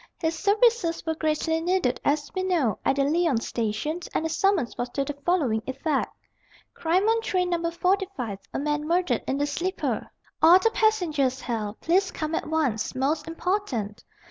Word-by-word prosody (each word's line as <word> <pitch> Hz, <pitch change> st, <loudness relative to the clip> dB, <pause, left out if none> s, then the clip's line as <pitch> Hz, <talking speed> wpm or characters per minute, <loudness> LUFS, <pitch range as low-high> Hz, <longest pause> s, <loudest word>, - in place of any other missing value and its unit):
His 325 Hz, -1 st, -1 dB
services 415 Hz, -2 st, +2 dB
were 320 Hz, -, 0 dB
greatly 320 Hz, +1 st, 0 dB
needed, 355 Hz, -6 st, 0 dB
as 290 Hz, 0 st, 0 dB
we 375 Hz, -, -1 dB
know, 335 Hz, -, +1 dB
at -, -, +2 dB
the 275 Hz, -, +2 dB
Lyons 300 Hz, -4 st, +1 dB
station 235 Hz, +9 st, -2 dB, 0.2 s
and 320 Hz, -, 0 dB
the -, -, 0 dB
summons 365 Hz, -6 st, +1 dB
was 245 Hz, 0 st, -3 dB
to 275 Hz, -, 0 dB
the 290 Hz, -, -3 dB
following 275 Hz, -11 st, +1 dB
effect: 275 Hz, +2 st, -1 dB, 0.6 s
"Crime 360 Hz, +5 st, +1 dB
on 455 Hz, 0 st, +3 dB
train 365 Hz, -4 st, 0 dB
No. 335 Hz, -1 st, 0 dB
45. 355 Hz, -, -1 dB
A -, -, -3 dB
man 295 Hz, +1 st, -1 dB
murdered 335 Hz, -8 st, +1 dB
in 265 Hz, -, 0 dB
the 290 Hz, -, +1 dB
sleeper. 350 Hz, +6 st, -2 dB, 0.3 s
All 340 Hz, +3 st, +8 dB
the 450 Hz, +4 st, +2 dB
passengers 315 Hz, -, +1 dB
held. 220 Hz, -3 st, -4 dB
Please 370 Hz, +3 st, +2 dB
come 310 Hz, -2 st, -4 dB
at 325 Hz, -, -2 dB
once. 275 Hz, -10 st, 0 dB
Most 295 Hz, +4 st, 0 dB
important." 325 Hz, -, -2 dB
320 Hz, 170 wpm, -26 LUFS, 270-365 Hz, 0.6 s, All